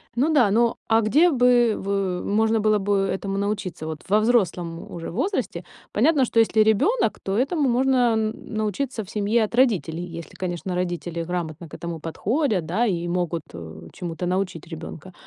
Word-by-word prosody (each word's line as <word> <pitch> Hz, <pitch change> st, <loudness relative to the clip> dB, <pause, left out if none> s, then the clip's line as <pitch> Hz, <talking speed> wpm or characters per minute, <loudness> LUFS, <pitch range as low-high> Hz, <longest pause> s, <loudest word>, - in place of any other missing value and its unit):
Ну 285 Hz, +6 st, +2 dB
да, 245 Hz, -9 st, +5 dB
но 230 Hz, +2 st, +2 dB
а 225 Hz, 0 st, +4 dB
где 295 Hz, +11 st, +4 dB
бы 245 Hz, -4 st, +4 dB
вы 195 Hz, -2 st, -2 dB
можно 220 Hz, +2 st, +2 dB
было 215 Hz, 0 st, +3 dB
бы 200 Hz, +1 st, +1 dB, 0.2 s
этому 195 Hz, 0 st, -3 dB
научиться? 200 Hz, -5 st, -3 dB
Вот 160 Hz, -1 st, -5 dB
во 210 Hz, +2 st, +5 dB
взрослом 185 Hz, -7 st, 0 dB
уже 165 Hz, -1 st, -6 dB
возрасте. 200 Hz, -, -2 dB, 0.3 s
Понятно, 270 Hz, +4 st, +3 dB
что 230 Hz, -, +1 dB
если 220 Hz, -1 st, +4 dB
ребёнок, 300 Hz, -, +2 dB
то 195 Hz, +1 st, -1 dB
этому 280 Hz, +3 st, +1 dB
можно 260 Hz, +2 st, +2 dB, 0.2 s
н 220 Hz, 0 st, 0 dB, 0.2 s
научиться 215 Hz, +3 st, -2 dB
в 195 Hz, -, -14 dB
семье 215 Hz, +2 st, +1 dB
от 215 Hz, -, -3 dB
родителей. 175 Hz, -9 st, +1 dB
Если, 165 Hz, -3 st, -9 dB
конечно, 180 Hz, 0 st, -4 dB
родители 175 Hz, -1 st, -3 dB
грамотно 170 Hz, -2 st, -4 dB
к -, -, -9 dB
этому 170 Hz, -1 st, -5 dB
подходят, 205 Hz, -, -1 dB
да, 205 Hz, +9 st, +1 dB
и 175 Hz, -4 st, -1 dB
могут, 175 Hz, -2 st, -1 dB
э, 80 Hz, -1 st, -9 dB
чему-то 175 Hz, 0 st, -5 dB
научить 180 Hz, -2 st, -2 dB
ребёнка. 165 Hz, +2 st, -8 dB
200 Hz, 175 wpm, -24 LUFS, 175-230 Hz, 0.3 s, да